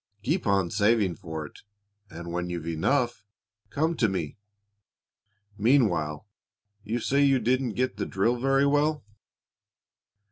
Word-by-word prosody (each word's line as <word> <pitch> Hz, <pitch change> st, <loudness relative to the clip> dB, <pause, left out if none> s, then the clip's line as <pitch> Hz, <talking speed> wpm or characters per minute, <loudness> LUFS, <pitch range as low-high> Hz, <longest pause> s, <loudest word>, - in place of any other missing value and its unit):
Keep 165 Hz, -, -1 dB
on 95 Hz, -3 st, +2 dB
saving 105 Hz, -2 st, +2 dB
for 80 Hz, -5 st, -6 dB
it, -, -, -13 dB, 0.5 s
and, 85 Hz, +1 st, -8 dB
when 90 Hz, +1 st, -3 dB
you've 85 Hz, -2 st, -4 dB
enough, 120 Hz, -, 0 dB, 0.5 s
come 160 Hz, +6 st, 0 dB
to 115 Hz, -, +2 dB
me. 85 Hz, -6 st, -3 dB, 1.2 s
Meanwhile 100 Hz, -, +2 dB, 0.6 s
you 110 Hz, +3 st, -2 dB
say 140 Hz, +4 st, +1 dB
you 135 Hz, -1 st, +4 dB
didn't 125 Hz, 0 st, 0 dB
get 130 Hz, +1 st, -1 dB
the -, -, -3 dB
drill 115 Hz, +6 st, +1 dB
very 135 Hz, +2 st, +3 dB
well?" 145 Hz, +1 st, +1 dB
110 Hz, 130 wpm, -27 LUFS, 85-135 Hz, 1.2 s, you